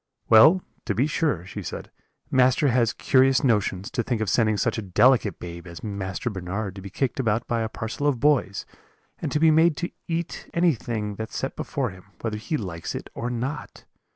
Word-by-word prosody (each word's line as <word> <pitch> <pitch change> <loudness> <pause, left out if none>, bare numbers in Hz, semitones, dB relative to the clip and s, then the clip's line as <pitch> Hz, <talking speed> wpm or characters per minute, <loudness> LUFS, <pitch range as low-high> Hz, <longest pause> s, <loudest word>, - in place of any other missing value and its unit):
"'Well, 155 +12 +7 0.2
to 105 - -1
be 125 +7 +3
sure,' 150 - 0
she - - -7
said, - - -7 0.4
'master 130 +2 +4
has 120 -2 +3
curious 130 0 +3
notions, 105 -4 +1
to 135 - 0
think 120 -1 -2
of 110 -3 0
sending 110 -3 +2
such 100 - 0
a - - -3
delicate 105 +1 +3
babe 85 0 -8
as 85 -2 -10
Master 100 +3 -3
Bernard 95 +1 -4
to 95 - -9
be 100 - -8
kicked 130 +7 -2
about 115 -2 0
by 115 -1 0
a 110 - -2
parcel 115 +7 -3
of 135 -5 +1
boys, 130 -9 +2 0.5
and - - -3
to 150 - +1
be 160 0 +6
made 160 0 +4
to 175 - -3 0.2
eat 170 0 -4
anything 120 -11 0
that's 110 0 -5
set - - -3
before - - -2
him, 90 0 -14 0.2
whether 110 -2 -2
he 110 +9 -2
likes 90 - -5
it - - -7
or 120 - -3
not. 130 +4 -5
115 Hz, 200 wpm, -25 LUFS, 100-135 Hz, 0.5 s, Well